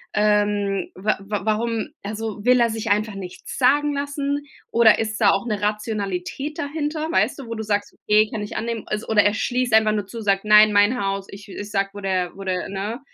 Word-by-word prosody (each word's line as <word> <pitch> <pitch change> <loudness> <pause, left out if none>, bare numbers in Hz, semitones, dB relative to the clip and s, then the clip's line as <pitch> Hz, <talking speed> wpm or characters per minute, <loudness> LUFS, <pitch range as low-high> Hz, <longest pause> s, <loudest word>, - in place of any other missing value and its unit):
Ähm, 205 -2 +1
wa 205 +3 0
wa 200 0 -4
warum 225 +1 0 0.2
also, 215 0 -5
will 250 0 +5
er 235 -1 +4
sich 220 -2 -3
einfach 210 0 +1
nichts 185 -2 -8
sagen 290 +3 +3
lassen 285 0 -2 0.2
oder 230 -2 +5
ist 215 -1 -2
da - - +6
auch 195 - -1
'ne 210 -3 -1
Rationalität 210 +5 -3
dahinter, 305 +2 -3
weißt 250 -2 +1
du, 265 - -8
wo 230 - -4
du 220 - -4
sagst: 205 -1 -1
„Okay, 215 +1 +2
kann 220 - -4
ich 205 - -6
annehmen.“ 230 -1 -3
Al 210 - -2
oder 210 -2 +4
er 205 - +3
schließt 245 +1 -1
einfach 220 -1 +5
nur 205 -2 -2
zu, 230 +2 -7
sagt: 195 -2 +1
„Nein, 210 0 +7
mein 205 +5 +4
Haus. 195 0 -2
Ich 200 +1 -11
ich 205 +1 -7
sage, 195 -1 0
wo 205 - -8
der 185 -3 -1
wo 195 - -8
der, 185 -1 -2
ne? 200 +5 -4
215 Hz, 215 wpm, -22 LUFS, 200-235 Hz, 0.2 s, Nein